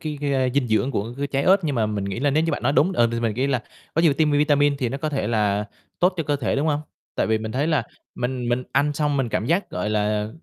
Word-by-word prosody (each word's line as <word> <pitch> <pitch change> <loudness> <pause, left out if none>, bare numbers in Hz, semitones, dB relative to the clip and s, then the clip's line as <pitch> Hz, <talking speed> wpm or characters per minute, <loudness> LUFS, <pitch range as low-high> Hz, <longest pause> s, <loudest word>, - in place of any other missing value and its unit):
cái 150 -2 -5
cái, 145 -1 -1
a, 130 -1 +2
dinh 130 -4 +1
dưỡng 110 +5 +1
của 115 0 -3
cái 140 - -1
trái 140 0 -1
ớt, 195 +1 +5
nhưng 145 -3 0
mà 110 -2 +1
mình 105 -2 -3
nghĩ 100 +4 -4
là 145 - +2
nếu 155 +3 +2
như 165 - 0
bạn - - -3
nói - - +2
đúng, 175 +6 +3
ờ, 120 -8 +3
thì 115 - -1
mình 115 -3 0
nghĩ 130 +3 0
là 130 -5 0 0.3
có 165 - +2
nhiều 160 -4 +5
tiêm 155 +1 +2
vitamin 145 -1 +3
thì 125 - 0
nó 135 +4 -4
có 155 - -2
thể 135 -8 -2
là 105 -2 +1 0.4
tốt 180 +1 +3
cho 165 - 0
cơ 145 -1 0
thể, 130 -2 -1
đúng 145 - 0
hông? 150 -1 +1 0.3
Tại - - 0
vì 110 0 +1
mình 110 0 -5
thấy 140 +4 0
là 160 -2 +2 0.3
mình 125 -1 -3
mình 125 +1 0
ăn 145 +2 +2
xong 145 -1 0
mình 130 -3 0
cảm 105 +1 -1
giác, 175 +6 0
gọi 105 +4 -2
là, 105 0 0
135 Hz, 305 wpm, -23 LUFS, 115-150 Hz, 0.4 s, ớt